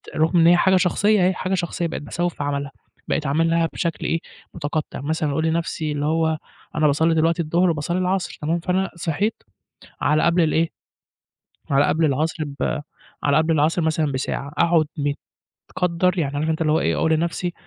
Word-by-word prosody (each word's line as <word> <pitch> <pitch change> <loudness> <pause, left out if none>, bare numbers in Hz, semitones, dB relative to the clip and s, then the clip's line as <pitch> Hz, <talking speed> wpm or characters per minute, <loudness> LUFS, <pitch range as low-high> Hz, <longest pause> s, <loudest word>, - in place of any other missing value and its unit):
رغم 160 +3 +3
إن 165 - +6
هي 175 - +6
حاجة 190 +2 +4
شخصية 195 +2 +3
أهي 185 - +3
حاجة 185 +1 -3
شخصية 175 -1 -1
بقيت 160 - -5
باسوّف 175 +3 -2
في - - -4
عملها، 140 -1 -2 0.4
بقيت 155 - -1
أعملها 165 +3 +2
بشكل 170 -2 -3
إيه 165 - 0 0.3
متقطع 155 -3 -4
مثلًا 155 +1 -1
أقول 160 +3 0
لنفسي 160 -1 -1
اللي 145 0 -2
هو 160 0 +1 0.4
أنا 150 0 +3
باصلي 160 +3 +2
دلوقتي 165 +2 +2
الضهر 170 +3 +2
وباصلي 165 +2 -1
العصر 185 -1 -1
تمام، 165 +3 0
فأنا 185 +2 0
صحيت 175 +6 -2 0.6
على 150 +1 +2
قبل 170 +1 +3
الإيه؟ 160 +1 +1 1.0
على 140 +1 +4
قبل 160 +1 +1
العصر 155 +3 0
ب 145 +2 -2 0.4
على 145 0 +3
قبل 160 +1 +3
العصر 155 +3 +2
مثلًا 155 -2 0
بساعة 135 +1 -3
أقعد 165 -2 +3 0.7
متكدر 180 +1 -1
يعني 145 -3 -1
عارف 155 +2 0
أنت 160 0 -2
اللي 155 -1 +2
هو 160 - +2
إيه - - +1
أقول 160 - +1
لنفسي 170 +2 -1
160 Hz, 180 wpm, -22 LUFS, 150-175 Hz, 1.0 s, إن